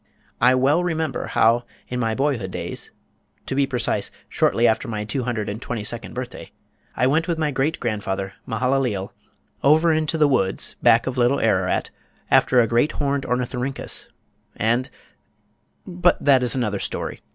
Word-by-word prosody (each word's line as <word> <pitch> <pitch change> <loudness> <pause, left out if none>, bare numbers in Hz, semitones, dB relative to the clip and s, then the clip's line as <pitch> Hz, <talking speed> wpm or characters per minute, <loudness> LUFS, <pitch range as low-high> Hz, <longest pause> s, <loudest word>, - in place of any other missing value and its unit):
I 125 +1 +5
well 140 +7 +3
remember 160 -3 -2
how, 115 +2 +3 0.2
in 125 - -3
my 115 -2 0
boyhood 130 -8 -1
days, - - -5 0.6
to - - -4
be 140 0 +2
precise, 120 -6 -1 0.2
shortly 120 +1 +2
after 110 +1 +1
my 105 -2 -3
two 120 +4 -3
hundred 115 -4 -2
and 105 +3 -5
twenty 120 -5 -4
second 115 +2 -5
birthday, 125 0 -7 0.5
I 125 - +3
went 155 +6 +2
with 170 -2 -1
my 155 -2 0
great 140 +4 -1
grandfather, 100 -4 -3
Mehalaleel, 125 -7 -1 0.5
over 160 +4 +5
into 155 +1 0
the 150 -2 +4
woods 95 -9 0
back 115 -1 +5
of 130 -1 -3
Little 125 +3 +3
Ararat 95 -4 +1 0.4
after 125 - +5
a 120 - +5
great 120 +7 +2
horned 140 -1 -1
Ornythyrhyncus 125 +2 -2 0.5
and 120 +4 0 1.0
but 175 0 +2
that 135 -3 +4
is 125 +1 +1
another 105 -6 -1
story. - - -4
125 Hz, 160 wpm, -22 LUFS, 115-140 Hz, 1.0 s, I